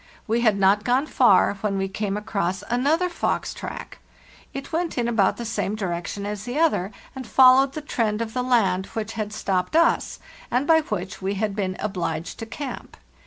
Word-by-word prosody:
We 230 Hz, +2 st, 0 dB
had 220 Hz, -4 st, +3 dB
not 195 Hz, +1 st, +3 dB
gone 255 Hz, +5 st, +2 dB
far 200 Hz, -8 st, +4 dB
when 205 Hz, -2 st, -1 dB
we 195 Hz, 0 st, -1 dB
came 200 Hz, +1 st, -3 dB
across 200 Hz, -2 st, -2 dB
another 295 Hz, +9 st, +2 dB
fox 345 Hz, -, -2 dB
track; -, -, -8 dB, 0.5 s
it 275 Hz, +3 st, -7 dB
went 335 Hz, -2 st, -1 dB
in 240 Hz, -1 st, +1 dB
about 220 Hz, -5 st, +2 dB
the 235 Hz, -, -5 dB
same 215 Hz, -2 st, -2 dB
direction 190 Hz, 0 st, -4 dB
as 205 Hz, 0 st, -4 dB
the 245 Hz, +5 st, -4 dB
other, 300 Hz, -, +2 dB, 0.2 s
and 260 Hz, -3 st, -7 dB
followed 265 Hz, +2 st, +6 dB
the 310 Hz, -, -5 dB
trend 225 Hz, -7 st, -1 dB
of 225 Hz, -1 st, -4 dB
the 250 Hz, -, 0 dB
land 200 Hz, -7 st, +2 dB
which 220 Hz, 0 st, -4 dB
had 215 Hz, -2 st, -4 dB
stopped 195 Hz, +2 st, -1 dB
us, 335 Hz, +1 st, +2 dB, 0.3 s
and 250 Hz, +3 st, +1 dB
by 320 Hz, +1 st, +5 dB
which 195 Hz, -, -5 dB
we 195 Hz, +1 st, -1 dB
had 205 Hz, 0 st, -1 dB
been 190 Hz, -2 st, -2 dB
obliged 175 Hz, -5 st, -3 dB
to 225 Hz, -, -6 dB
camp. 275 Hz, +3 st, -7 dB
215 Hz, 190 wpm, -24 LUFS, 195-255 Hz, 0.5 s, followed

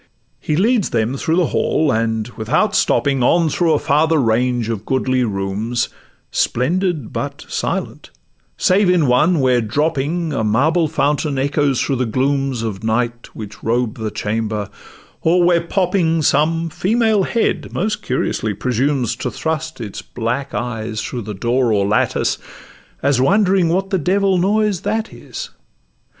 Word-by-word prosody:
He 150 Hz, -, -1 dB
leads 215 Hz, +3 st, +2 dB
them 115 Hz, +2 st, 0 dB
through 160 Hz, +4 st, 0 dB
the 180 Hz, -1 st, +3 dB
hall, 155 Hz, -3 st, +1 dB
and, 110 Hz, -1 st, 0 dB
without 125 Hz, -, 0 dB
stopping, 140 Hz, -2 st, +2 dB
On 165 Hz, +6 st, +3 dB
through 165 Hz, +1 st, +2 dB
a -, -, +3 dB
farther 155 Hz, +3 st, +2 dB
range 120 Hz, -1 st, +1 dB
of 110 Hz, -3 st, -3 dB
goodly 130 Hz, +1 st, 0 dB
rooms, 105 Hz, +3 st, -2 dB, 0.4 s
Splendid 165 Hz, -, 0 dB
but -, -, -4 dB
silent, -, -, -3 dB, 0.5 s
save 190 Hz, +1 st, +3 dB
in 180 Hz, -4 st, +3 dB
one, 150 Hz, +7 st, +3 dB
where, 125 Hz, -2 st, +3 dB
dropping, 155 Hz, +6 st, -1 dB
A 115 Hz, -, -1 dB
marble 155 Hz, +10 st, +2 dB
fountain 145 Hz, -1 st, 0 dB
echoes 140 Hz, -1 st, +1 dB
through 135 Hz, -, 0 dB
the 125 Hz, -1 st, 0 dB
glooms 135 Hz, 0 st, 0 dB
Of 105 Hz, -2 st, -4 dB
night 120 Hz, +1 st, -1 dB
which 105 Hz, -1 st, -9 dB
robe 120 Hz, 0 st, -1 dB
the 110 Hz, -1 st, -2 dB
chamber, 105 Hz, -1 st, -3 dB, 0.5 s
or 175 Hz, +2 st, +3 dB
where 175 Hz, -1 st, +4 dB
popping 170 Hz, -2 st, +1 dB
Some 165 Hz, +4 st, +2 dB
female 220 Hz, +3 st, +2 dB
head 230 Hz, +4 st, -1 dB
most 215 Hz, +3 st, -2 dB
curiously 110 Hz, -, -1 dB
presumes 125 Hz, +2 st, 0 dB
To -, -, -3 dB
thrust 160 Hz, -1 st, -3 dB
its 105 Hz, -4 st, -6 dB
black 125 Hz, +4 st, -3 dB
eyes 115 Hz, -2 st, -3 dB
through 125 Hz, -, -4 dB
the 105 Hz, -1 st, -6 dB
door 120 Hz, +4 st, +1 dB
or 100 Hz, -2 st, +2 dB
lattice, 105 Hz, +2 st, +1 dB, 0.6 s
As 135 Hz, -2 st, +2 dB
wondering 190 Hz, +2 st, +3 dB
what 190 Hz, +3 st, 0 dB
the 190 Hz, -, +1 dB
devil 190 Hz, +3 st, +2 dB
a -, -, +1 dB
noise 205 Hz, 0 st, +1 dB
that 220 Hz, 0 st, -2 dB
is. -, -, -8 dB
140 Hz, 150 wpm, -19 LUFS, 115-170 Hz, 0.6 s, where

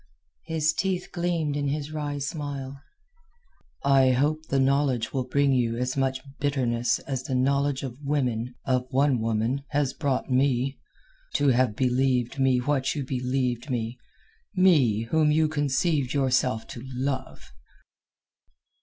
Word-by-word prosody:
His 160 Hz, -1 st, +1 dB
teeth 185 Hz, +1 st, -1 dB
gleamed 170 Hz, -4 st, -1 dB
in 145 Hz, -1 st, -1 dB
his 145 Hz, +1 st, -3 dB
wry 145 Hz, -2 st, -3 dB
smile. 140 Hz, -2 st, -5 dB, 1.0 s
"I 135 Hz, -2 st, +5 dB
hope 155 Hz, +5 st, 0 dB
the 135 Hz, -, +1 dB
knowledge 135 Hz, -3 st, +1 dB
will 130 Hz, -2 st, -1 dB
bring 140 Hz, +1 st, +2 dB
you 120 Hz, -2 st, +1 dB
as 125 Hz, +1 st, -1 dB
much 135 Hz, -1 st, 0 dB, 0.2 s
bitterness 125 Hz, -5 st, +1 dB
as 135 Hz, -3 st, -4 dB
the 130 Hz, 0 st, -3 dB
knowledge 140 Hz, +1 st, +1 dB
of 130 Hz, +1 st, -7 dB
women—of 125 Hz, -2 st, -1 dB
one 135 Hz, -1 st, +2 dB
woman—has 125 Hz, +6 st, -1 dB
brought 140 Hz, -4 st, -1 dB
me. 130 Hz, 0 st, +1 dB, 0.6 s
To 145 Hz, -, +3 dB
have 125 Hz, -3 st, +2 dB
believed 130 Hz, 0 st, +1 dB
me 130 Hz, -1 st, +3 dB
what 135 Hz, +2 st, 0 dB
you 140 Hz, -3 st, -3 dB
believed 125 Hz, 0 st, -2 dB
me—me 125 Hz, -, 0 dB
whom 155 Hz, -1 st, +3 dB
you 155 Hz, +1 st, +3 dB
conceived 145 Hz, -1 st, 0 dB
yourself 130 Hz, -4 st, +1 dB
to 120 Hz, -, -8 dB
love!" 130 Hz, +1 st, -4 dB
135 Hz, 125 wpm, -26 LUFS, 125-145 Hz, 1.0 s, I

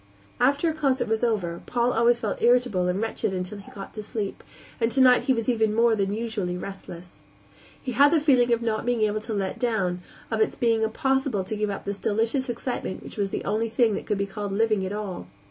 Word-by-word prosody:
After 280 Hz, +6 st, +3 dB
a 320 Hz, -, +1 dB
concert 275 Hz, -4 st, 0 dB
was 220 Hz, +1 st, 0 dB
over 185 Hz, -8 st, 0 dB
Paul 240 Hz, 0 st, +1 dB
was 235 Hz, 0 st, +3 dB
always 210 Hz, -, -2 dB
irritable 240 Hz, -7 st, +3 dB
and 180 Hz, +2 st, 0 dB
wretched 220 Hz, -3 st, -2 dB
until 185 Hz, +3 st, -4 dB
he 200 Hz, -, -13 dB
got 195 Hz, -1 st, -9 dB
to 215 Hz, -, -5 dB
sleep, 210 Hz, -1 st, -5 dB, 0.4 s
and 230 Hz, 0 st, +1 dB
tonight 255 Hz, -1 st, +5 dB
he 265 Hz, -, +4 dB
was 230 Hz, -2 st, -2 dB
even 220 Hz, -3 st, +2 dB
more 230 Hz, 0 st, +4 dB
than 195 Hz, -2 st, 0 dB
usually 210 Hz, -5 st, -2 dB
restless. 180 Hz, -2 st, -9 dB, 0.6 s
He 255 Hz, -, -5 dB
had 280 Hz, +5 st, +5 dB
the 330 Hz, -, +4 dB
feeling 255 Hz, -5 st, +3 dB
of 235 Hz, 0 st, +2 dB
not 220 Hz, -2 st, -1 dB
being 240 Hz, -2 st, +1 dB
able 215 Hz, 0 st, 0 dB
to 220 Hz, +1 st, -5 dB
let 195 Hz, -2 st, -2 dB
down, 195 Hz, -8 st, 0 dB, 0.3 s
of 220 Hz, -1 st, 0 dB
its -, -, +1 dB
being 230 Hz, -2 st, +2 dB
impossible 265 Hz, -1 st, 0 dB
to 195 Hz, +4 st, -4 dB
give 210 Hz, 0 st, -1 dB
up 200 Hz, -, -5 dB
this 200 Hz, 0 st, -4 dB
delicious 230 Hz, +5 st, 0 dB
excitement 240 Hz, -4 st, -4 dB
which -, -, -10 dB
was 200 Hz, -1 st, 0 dB
the -, -, -4 dB
only 220 Hz, +3 st, 0 dB
thing 230 Hz, -1 st, +2 dB
that -, -, -4 dB
could 210 Hz, -, 0 dB
be 200 Hz, -, 0 dB
called 205 Hz, 0 st, -5 dB
living 215 Hz, -1 st, +2 dB
at -, -, -5 dB
all. 200 Hz, -, -5 dB
220 Hz, 225 wpm, -25 LUFS, 200-240 Hz, 0.6 s, tonight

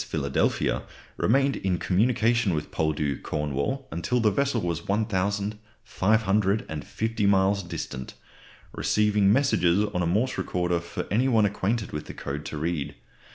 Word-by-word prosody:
Philadelphia 70 Hz, -3 st, 0 dB, 0.3 s
remained 135 Hz, +4 st, +2 dB
in 95 Hz, -2 st, 0 dB
communication 110 Hz, +2 st, +2 dB
with 75 Hz, -, -4 dB
Poldhu, 75 Hz, -3 st, -1 dB
Cornwall, 75 Hz, -, -2 dB
until 85 Hz, +9 st, 0 dB
the 110 Hz, -2 st, +3 dB
vessel 140 Hz, +3 st, +1 dB
was 85 Hz, -4 st, -3 dB
1550 105 Hz, -, -1 dB
miles 100 Hz, 0 st, +3 dB
distant, 65 Hz, -7 st, -6 dB, 0.6 s
receiving 105 Hz, -2 st, +2 dB
messages 105 Hz, -7 st, +3 dB
on 90 Hz, -, 0 dB
a 85 Hz, -, +1 dB
Morse 110 Hz, +9 st, 0 dB
recorder 90 Hz, -1 st, 0 dB
for 90 Hz, +2 st, -5 dB
any 120 Hz, +6 st, +2 dB
one 110 Hz, -5 st, +4 dB
acquainted 105 Hz, +2 st, -1 dB
with 75 Hz, -, -5 dB
the -, -, -8 dB
code 75 Hz, +2 st, -5 dB
to 75 Hz, -, -5 dB
read. 80 Hz, -1 st, -2 dB
100 Hz, 130 wpm, -26 LUFS, 85-110 Hz, 0.6 s, one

